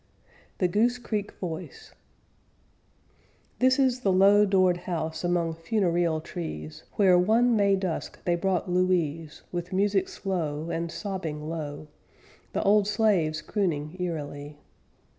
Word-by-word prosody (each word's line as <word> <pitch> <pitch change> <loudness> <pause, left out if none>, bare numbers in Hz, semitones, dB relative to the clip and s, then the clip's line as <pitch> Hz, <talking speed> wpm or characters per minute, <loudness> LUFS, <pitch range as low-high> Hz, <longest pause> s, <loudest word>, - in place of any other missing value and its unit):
THE 180 - +2
GOOSE 230 +7 +2
CREEK 215 -4 -3
VOICE 185 - -7 1.7
This 260 +1 +4
is 260 -2 +2
the 200 -6 +1
low 200 +3 +6
doored 185 -2 +3
house 160 -2 -4
among 175 -2 0
funereal 170 -2 0
trees, 80 - -7
Where 185 -3 +5
one 230 +6 +3
May 200 -2 +4
dusk 190 -4 -3
they 175 - +2
brought 180 +1 0
Louise, 170 -4 0
With 175 0 -4
music 195 0 +1
slow, 165 -5 -3
And 165 0 -3
sobbing 165 -8 -5
low, 155 -2 -5 0.7
The - - 0
old 205 0 +4
slaves 195 -8 +1
crooning 165 -6 -2
eerily. 145 -4 -5
180 Hz, 120 wpm, -27 LUFS, 160-200 Hz, 1.7 s, low